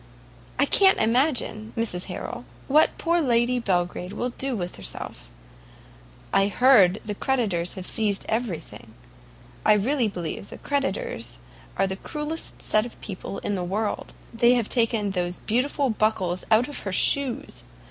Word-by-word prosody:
I -, -, +4 dB
can't 385 Hz, -1 st, +6 dB
imagine, 230 Hz, -2 st, +1 dB
Mrs 205 Hz, -6 st, -1 dB
Harrel, 180 Hz, -8 st, -6 dB, 0.2 s
what 305 Hz, +3 st, +4 dB
poor 340 Hz, +1 st, +1 dB
Lady 245 Hz, -2 st, +2 dB
Belgrade 180 Hz, -3 st, -1 dB
will 245 Hz, +1 st, -2 dB
do 265 Hz, +1 st, -2 dB
with 180 Hz, -4 st, -5 dB
herself; -, -, -6 dB, 1.0 s
I 195 Hz, 0 st, +4 dB
hear 245 Hz, -2 st, +6 dB, 0.2 s
the 210 Hz, -, -3 dB
creditors 205 Hz, -8 st, -1 dB
have 185 Hz, -2 st, -7 dB
seized 205 Hz, -2 st, +2 dB
every 220 Hz, -6 st, -1 dB
thing; 115 Hz, -7 st, -14 dB, 0.7 s
I 215 Hz, -, +6 dB
really 235 Hz, +4 st, +2 dB
believe 180 Hz, -1 st, -5 dB
creditors 270 Hz, -, -2 dB, 0.4 s
are -, -, +3 dB
the 190 Hz, 0 st, -3 dB
cruelest 300 Hz, +7 st, -5 dB
set 215 Hz, -, +3 dB
of 240 Hz, -, -10 dB
people 195 Hz, 0 st, -6 dB
in 205 Hz, -, 0 dB
the 185 Hz, -2 st, -2 dB
world! 205 Hz, +4 st, -3 dB, 0.2 s
they 235 Hz, +2 st, +4 dB
have 235 Hz, -4 st, -1 dB
taken 225 Hz, -4 st, +1 dB
those 180 Hz, -1 st, -3 dB
beautiful 260 Hz, +3 st, 0 dB
buckles 190 Hz, -5 st, 0 dB
out 220 Hz, +3 st, +4 dB
of 290 Hz, -, -5 dB
her 195 Hz, -, -5 dB
shoes! 275 Hz, +7 st, +1 dB
220 Hz, 145 wpm, -25 LUFS, 190-250 Hz, 1.0 s, can't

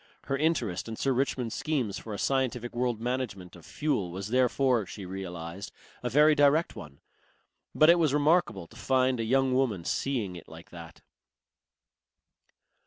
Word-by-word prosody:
Her 135 Hz, -, -2 dB
interest 130 Hz, -, -1 dB
in 115 Hz, -, -5 dB
Sir 135 Hz, -, 0 dB
Richmond's 125 Hz, -3 st, -1 dB
schemes 130 Hz, -10 st, -2 dB
for 110 Hz, -, -9 dB
a 100 Hz, -, -4 dB
scientific 125 Hz, -2 st, -1 dB
world 120 Hz, -2 st, -1 dB
management 115 Hz, -7 st, -4 dB
of 85 Hz, -, -14 dB
fuel 140 Hz, -, -1 dB
was 95 Hz, +3 st, -6 dB
therefore, 125 Hz, -2 st, +2 dB
she 95 Hz, 0 st, -8 dB
realized, 90 Hz, -1 st, -7 dB, 0.3 s
a 125 Hz, -, -2 dB
very 150 Hz, +5 st, +5 dB
direct 145 Hz, +3 st, +3 dB
one. 70 Hz, -1 st, -11 dB, 0.7 s
But 155 Hz, +2 st, +7 dB
it 175 Hz, -, +3 dB
was 155 Hz, -4 st, +2 dB
remarkable 145 Hz, -, +2 dB
to -, -, -19 dB
find 130 Hz, -1 st, +1 dB
a -, -, 0 dB
young 130 Hz, +3 st, +2 dB
woman 115 Hz, -10 st, 0 dB
seeing 115 Hz, -10 st, -2 dB
it 85 Hz, -, -11 dB
like 80 Hz, +1 st, -13 dB
that. 85 Hz, -2 st, -11 dB
120 Hz, 160 wpm, -28 LUFS, 95-135 Hz, 0.7 s, But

